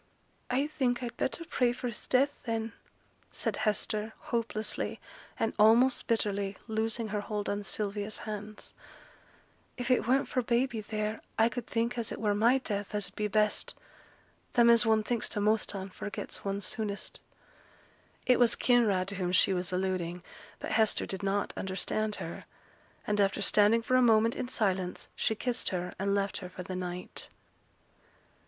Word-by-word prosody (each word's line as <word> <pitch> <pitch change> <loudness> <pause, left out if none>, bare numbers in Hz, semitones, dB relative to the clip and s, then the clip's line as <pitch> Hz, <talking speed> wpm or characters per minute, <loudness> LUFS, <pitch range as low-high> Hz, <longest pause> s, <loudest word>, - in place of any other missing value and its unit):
'I 265 +3 +2
think 255 -5 0
I'd 235 -1 -4
better 335 +7 -2
pray 250 -6 +2
for 250 - -7
his 235 - -7
death, 275 +3 +2
then,' 225 0 -2 0.6
said - - -2
Hester, 215 0 -1
hopelessly, 230 -2 -2 0.4
and 225 - +1
almost 235 +4 +5
bitterly, 200 -3 0
loosing 220 0 -1
her 210 0 -1
hold 205 0 -3
of 205 0 -1
Sylvia's 205 0 -2
hands. 210 0 -6 1.0
'If 245 0 -1
it 250 - +3
weren't 265 +3 +3
for 255 - 0
baby 240 -1 +1
theere, 215 0 -3 0.2
I 225 +1 +5
could 240 -1 -5
think 235 +1 0
as 230 - -2
it - - -5
were 210 -2 +2
my 230 +5 +4
death 210 -5 -3
as 205 -3 0
'ud - - -25
be 210 - 0
best. 210 +1 +1 0.8
Them 235 -1 +6
as 235 0 +5
one 220 -1 +4
thinks 235 0 -1
t' - - -2
most 210 0 +1
on, 190 0 -5
forgets 205 - -6
one 200 0 -2
soonest.' 205 0 -3 1.1
It 250 -1 +4
was 240 -2 +6
Kinraid 215 -7 +3
to 200 - -4
whom 180 -2 -1
she 185 +1 +4
was 180 -1 -2
alluding; 180 -1 -1 0.3
but - - -5
Hester 220 -1 +3
did 190 - -5
not 200 +1 0
understand 200 +3 -1
her; - - -6 0.6
and 210 0 +1
after 195 +1 +2
standing 215 +3 +4
for 255 +2 +1
a 255 - +6
moment 225 -1 +4
in 245 - -3
silence, 190 -6 -1
she 220 - 0
kissed 245 +2 -1
her, 180 -1 -3
and 200 +1 +1
left 200 -1 0
her 180 - -7
for 180 - -7
the 185 +1 -5
night. 180 0 -5
215 Hz, 170 wpm, -30 LUFS, 200-235 Hz, 1.1 s, Them